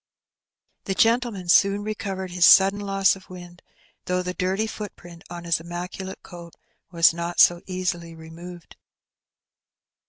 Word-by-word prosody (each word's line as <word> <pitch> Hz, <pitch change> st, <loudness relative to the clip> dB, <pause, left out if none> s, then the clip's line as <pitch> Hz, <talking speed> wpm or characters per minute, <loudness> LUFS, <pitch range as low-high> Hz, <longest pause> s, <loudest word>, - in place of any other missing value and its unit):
The 195 Hz, -, -2 dB
gentleman 225 Hz, -4 st, +1 dB
soon 200 Hz, +3 st, +3 dB
recovered 195 Hz, -3 st, -5 dB
his 180 Hz, -1 st, 0 dB
sudden 195 Hz, +2 st, +6 dB
loss 195 Hz, -1 st, +1 dB
of 190 Hz, -1 st, -17 dB
wind, 175 Hz, -1 st, -12 dB, 0.4 s
though 180 Hz, 0 st, -1 dB
the 180 Hz, 0 st, -4 dB
dirty 190 Hz, +4 st, -1 dB
footprint 175 Hz, -6 st, -9 dB
on 175 Hz, 0 st, -8 dB
his 170 Hz, -2 st, 0 dB
immaculate 180 Hz, +3 st, -7 dB
coat 170 Hz, -2 st, -12 dB, 0.3 s
was 165 Hz, -2 st, +4 dB
not 170 Hz, +1 st, -5 dB
so 175 Hz, 0 st, +5 dB
easily 180 Hz, -3 st, -4 dB
removed. 165 Hz, +2 st, -12 dB
180 Hz, 130 wpm, -23 LUFS, 175-195 Hz, 0.4 s, sudden